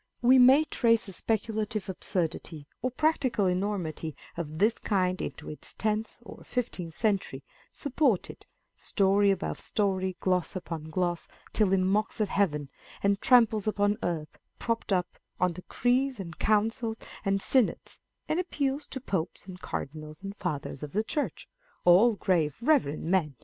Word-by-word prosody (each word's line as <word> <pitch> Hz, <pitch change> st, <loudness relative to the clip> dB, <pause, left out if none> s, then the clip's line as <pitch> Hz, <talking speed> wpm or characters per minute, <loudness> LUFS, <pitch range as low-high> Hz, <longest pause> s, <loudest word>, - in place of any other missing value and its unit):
1 245 Hz, -, +2 dB
We 260 Hz, 0 st, +8 dB
may 265 Hz, +5 st, +7 dB
trace 230 Hz, -6 st, +2 dB
a 195 Hz, -, -8 dB
speculative 215 Hz, 0 st, -2 dB
absurdity 165 Hz, -4 st, -3 dB, 0.2 s
or 255 Hz, -, 0 dB
practical 260 Hz, -6 st, +1 dB
enormity 180 Hz, -4 st, -2 dB, 0.2 s
of 155 Hz, -2 st, -5 dB
this 215 Hz, +6 st, +2 dB
kind 185 Hz, -3 st, 0 dB
into -, -, -6 dB
its 150 Hz, -, -8 dB
tenth 215 Hz, +1 st, -1 dB
or -, -, -11 dB
fifteenth 185 Hz, -10 st, -4 dB
century, 205 Hz, -4 st, 0 dB, 0.3 s
supported, 265 Hz, -, -1 dB, 0.3 s
story 200 Hz, 0 st, +2 dB
above 195 Hz, -1 st, -1 dB
story, 190 Hz, -3 st, -1 dB
gloss 185 Hz, -1 st, 0 dB
upon 165 Hz, -4 st, -5 dB
gloss, 175 Hz, +1 st, -1 dB, 0.3 s
till 210 Hz, -4 st, +3 dB
it 195 Hz, -, +4 dB
mocks 205 Hz, +5 st, 0 dB
at 210 Hz, -2 st, +1 dB
Heaven, 150 Hz, -9 st, 0 dB, 0.3 s
and 200 Hz, 0 st, +2 dB
tramples 225 Hz, -4 st, +4 dB
upon 205 Hz, 0 st, +1 dB
earth, 160 Hz, -3 st, -3 dB, 0.2 s
propped 230 Hz, -2 st, -2 dB
up 180 Hz, -2 st, 0 dB, 0.2 s
on 180 Hz, -1 st, +2 dB
decrees 245 Hz, +8 st, 0 dB
and 170 Hz, -4 st, -7 dB
councils 225 Hz, +2 st, +1 dB, 0.2 s
and 195 Hz, -1 st, +1 dB
synods, 250 Hz, +3 st, +1 dB, 0.3 s
and 315 Hz, -, 0 dB
appeals 290 Hz, -5 st, -1 dB
to 265 Hz, -, -5 dB
popes 185 Hz, -9 st, -3 dB
and 185 Hz, -1 st, -10 dB
cardinals 155 Hz, +4 st, -6 dB
and 195 Hz, +1 st, -6 dB
fathers 150 Hz, -9 st, -4 dB
of 150 Hz, -1 st, -7 dB
the 215 Hz, +3 st, +1 dB
church 295 Hz, +6 st, -3 dB, 0.4 s
(all 200 Hz, +7 st, +6 dB
grave, 165 Hz, -8 st, +1 dB
reverend 240 Hz, -, +2 dB
men 165 Hz, -5 st, +1 dB
200 Hz, 150 wpm, -28 LUFS, 180-230 Hz, 0.4 s, We